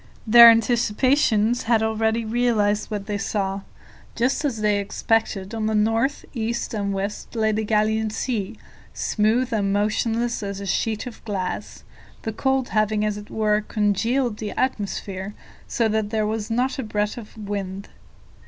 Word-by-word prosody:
Their 235 Hz, +1 st, +10 dB
anticipations 235 Hz, 0 st, +2 dB
had 225 Hz, -2 st, +4 dB
already 220 Hz, +1 st, 0 dB
realized 220 Hz, -3 st, +1 dB
what 205 Hz, -2 st, -4 dB
they 205 Hz, -1 st, -3 dB
saw. 195 Hz, -1 st, -2 dB, 0.5 s
Just 255 Hz, +5 st, 0 dB
as 260 Hz, -7 st, -1 dB
they 210 Hz, -1 st, +2 dB
expected, 200 Hz, 0 st, -1 dB
on 220 Hz, -1 st, -1 dB
the 220 Hz, -, 0 dB
north, 225 Hz, +6 st, +1 dB
east, 235 Hz, -1 st, -3 dB
and 200 Hz, -2 st, -1 dB
west 200 Hz, +4 st, -4 dB
lay 220 Hz, -1 st, +2 dB
the 215 Hz, +1 st, -1 dB
Gallian 215 Hz, +1 st, +1 dB
Sea, 220 Hz, -3 st, -3 dB, 0.4 s
smooth 230 Hz, +4 st, +1 dB
and 200 Hz, -3 st, +1 dB
motionless 225 Hz, +3 st, 0 dB
as 200 Hz, -1 st, -4 dB
a 200 Hz, -, -6 dB
sheet 220 Hz, +3 st, -1 dB
of 245 Hz, -, -9 dB
glass, 195 Hz, -4 st, -4 dB, 0.4 s
the 220 Hz, -, -3 dB
cold 265 Hz, +2 st, 0 dB
having, 215 Hz, 0 st, +1 dB
as 210 Hz, -1 st, -1 dB
it 210 Hz, 0 st, -9 dB
were, 215 Hz, -1 st, +1 dB
congealed 215 Hz, +3 st, 0 dB
the 215 Hz, -1 st, -5 dB
atmosphere 200 Hz, -5 st, -3 dB, 0.3 s
so 230 Hz, -, +1 dB
that 215 Hz, -1 st, 0 dB
there 215 Hz, -1 st, 0 dB
was 215 Hz, 0 st, -3 dB
not 250 Hz, +4 st, 0 dB
a -, -, -1 dB
breath 210 Hz, -1 st, -1 dB
of 225 Hz, -2 st, -11 dB
wind. 200 Hz, -2 st, -5 dB
215 Hz, 155 wpm, -23 LUFS, 205-230 Hz, 0.5 s, Their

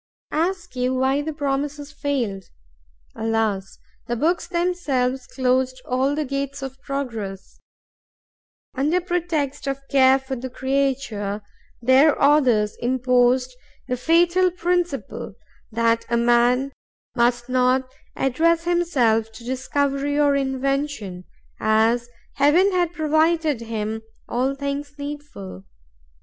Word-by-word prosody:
Ask 350 Hz, +1 st, -1 dB
you 250 Hz, +1 st, 0 dB
why 265 Hz, +2 st, +2 dB
the 315 Hz, +2 st, -3 dB
promises 290 Hz, 0 st, -3 dB
failed? 245 Hz, -10 st, -2 dB, 0.7 s
Alas! 220 Hz, -4 st, -1 dB, 0.3 s
the 240 Hz, -, -1 dB
books 330 Hz, +8 st, 0 dB
themselves 295 Hz, -8 st, -1 dB
closed 255 Hz, 0 st, 0 dB
all 265 Hz, +3 st, +1 dB
the 305 Hz, 0 st, -1 dB
gates 275 Hz, 0 st, -3 dB
of 270 Hz, 0 st, -7 dB
progress. 225 Hz, -10 st, -5 dB, 1.1 s
Under 300 Hz, +7 st, +1 dB
pretext 335 Hz, -6 st, -2 dB
of 275 Hz, 0 st, -4 dB
care 265 Hz, -1 st, +6 dB
for 265 Hz, 0 st, -5 dB
the 260 Hz, +1 st, -6 dB
creature, 255 Hz, -6 st, -1 dB, 0.4 s
their 265 Hz, +5 st, +5 dB
authors 255 Hz, -8 st, +3 dB
imposed 250 Hz, 0 st, +2 dB, 0.3 s
the 250 Hz, -, 0 dB
fatal 345 Hz, +6 st, +3 dB
principle 355 Hz, 0 st, -2 dB, 0.4 s
that 230 Hz, 0 st, +2 dB
a 235 Hz, -, +2 dB
man 240 Hz, +3 st, +3 dB, 0.4 s
must 240 Hz, 0 st, +2 dB
not 255 Hz, +1 st, +2 dB, 0.3 s
address 330 Hz, +6 st, +2 dB
himself 265 Hz, -11 st, +1 dB
to 220 Hz, -, -12 dB
discovery 275 Hz, +3 st, -1 dB
or 285 Hz, -1 st, +4 dB
invention, 270 Hz, -8 st, -2 dB, 0.3 s
as 225 Hz, +2 st, +2 dB, 0.3 s
Heaven 315 Hz, +8 st, +4 dB
had 355 Hz, -2 st, +1 dB
provided 315 Hz, -3 st, +1 dB
him 220 Hz, -1 st, -3 dB, 0.3 s
all 260 Hz, +3 st, 0 dB
things 280 Hz, +1 st, -4 dB
needful. 285 Hz, -, -8 dB
270 Hz, 110 wpm, -23 LUFS, 240-295 Hz, 1.1 s, care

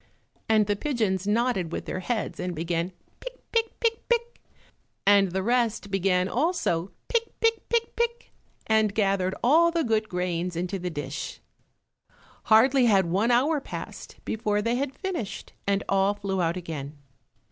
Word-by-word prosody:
And 215 Hz, -1 st, +5 dB
the 205 Hz, 0 st, 0 dB
pigeons 205 Hz, -7 st, -1 dB
nodded 215 Hz, -6 st, +1 dB
with -, -, -4 dB
their -, -, -3 dB
heads 220 Hz, +4 st, -3 dB
and 180 Hz, -1 st, -3 dB
began 170 Hz, +2 st, -2 dB, 0.3 s
pick, -, -, -9 dB
pick, 455 Hz, -1 st, 0 dB
pick, 460 Hz, -1 st, -1 dB
pick, 475 Hz, 0 st, 0 dB, 0.7 s
and 200 Hz, -2 st, +5 dB
the 190 Hz, +1 st, -1 dB
rest 230 Hz, -3 st, 0 dB
began 185 Hz, -1 st, +2 dB
also 235 Hz, -, 0 dB, 0.2 s
pick, 465 Hz, -1 st, -1 dB
pick, 455 Hz, 0 st, +1 dB
pick, 465 Hz, -1 st, 0 dB
pick, 470 Hz, 0 st, -2 dB, 0.3 s
and 220 Hz, -2 st, +2 dB
gathered 195 Hz, -3 st, +1 dB
all 325 Hz, +7 st, +5 dB
the 335 Hz, -1 st, 0 dB
good 220 Hz, -3 st, 0 dB
grains 180 Hz, -1 st, -2 dB
into 180 Hz, +3 st, -2 dB
the 180 Hz, 0 st, -3 dB
dish. 145 Hz, -3 st, -5 dB, 1.1 s
Hardly 250 Hz, +4 st, +5 dB
had 195 Hz, -4 st, +4 dB
one 205 Hz, +6 st, +2 dB
hour 275 Hz, +5 st, +3 dB
passed -, -, -8 dB
before 210 Hz, -1 st, 0 dB
they 230 Hz, +3 st, 0 dB
had 270 Hz, +1 st, -2 dB
finished, 335 Hz, -, -5 dB
and 200 Hz, 0 st, +1 dB
all 195 Hz, +1 st, +2 dB
flew 195 Hz, -2 st, -2 dB
out 170 Hz, +1 st, 0 dB
again. 150 Hz, -4 st, -6 dB
210 Hz, 155 wpm, -26 LUFS, 185-265 Hz, 1.1 s, And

